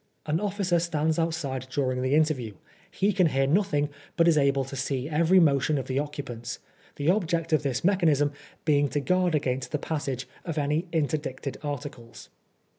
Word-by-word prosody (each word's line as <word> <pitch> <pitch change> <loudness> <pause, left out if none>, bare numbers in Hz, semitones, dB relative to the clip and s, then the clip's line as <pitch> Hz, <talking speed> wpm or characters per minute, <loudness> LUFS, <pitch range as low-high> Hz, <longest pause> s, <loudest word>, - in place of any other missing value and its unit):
An 155 +1 0
officer 195 -3 0
stands 160 -1 0
outside 140 -6 -2
during 130 -2 -1
the 130 +3 +2
interview: 150 -8 +1 0.4
he 200 +2 +1
can 185 -3 +4
hear 135 -2 +1
nothing, 150 -2 +1 0.3
but 170 - +5
he - - +6
is 165 - +4
able 140 -1 +2
to 135 - -8
see 130 0 -2
every 165 +4 +4
motion 145 -2 +3
of 135 - -3
the 130 +1 -1
occupants; 135 -5 -5 0.4
the 150 +4 +2
object 170 -4 0
of 155 - +4
this 135 -4 -2
mechanism 160 -7 +3 0.3
being 145 -2 +3
to 145 - -1
guard 180 +2 +1
against 130 -3 -1
the 150 - 0
passage 140 -4 -3 0.2
of 165 -3 -4
any 150 +4 0
interdicted 145 -4 -2
articles. 145 -5 -7
150 Hz, 175 wpm, -27 LUFS, 135-165 Hz, 0.4 s, he